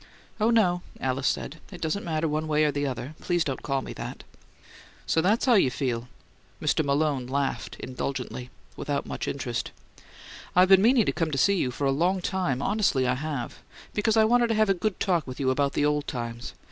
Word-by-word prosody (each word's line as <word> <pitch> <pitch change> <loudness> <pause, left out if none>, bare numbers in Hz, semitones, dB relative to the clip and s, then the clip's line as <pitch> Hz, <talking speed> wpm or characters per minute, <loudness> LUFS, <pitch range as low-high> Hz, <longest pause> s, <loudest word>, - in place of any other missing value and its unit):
"Oh, 215 +2 +3
no," 185 -7 +3 0.2
Alice 130 +1 -1
said. 160 +4 -2
"It 180 - -9
doesn't 165 +6 -2
matter 160 -1 -1
one 155 +1 -1
way 155 0 +2
or 150 - +2
the 145 0 -1
other. 130 +2 -5
Please 175 -2 +1
don't 135 -5 -3
call 135 -2 -1
me - - -7
that." - - -7 0.8
"So 160 - +2
that's 210 +8 +2
how 255 - +5
you 190 - +5
feel?" 125 -2 -2 0.5
Mr. 155 - +1
Malone 140 -2 0
laughed 135 +1 -2
indulgently, 125 -1 -4 0.3
without 145 -1 -2
much - - -4
interest. 120 -4 -3 0.9
"I've 180 +1 +6
been 190 -1 +8
meaning 235 0 +5
to - - +2
come 165 -3 -1
to 140 - -2
see 200 +9 +4
you 130 - +1
for 135 +3 -3
a 135 - +3
long 175 +7 +1
time 175 -8 -1
honestly 195 -11 +2
I 125 - +2
have 135 -2 -4 0.3
because 215 +1 +1
I 220 - +6
wanted 240 +1 +4
to 225 - 0
have 215 -1 +3
a - - +5
good 195 +2 -2
talk 175 -6 +1
with 130 - -7
you 130 -2 +2
about 140 +1 0
old 150 0 +1
times. 120 -2 -5
150 Hz, 205 wpm, -27 LUFS, 135-190 Hz, 0.9 s, been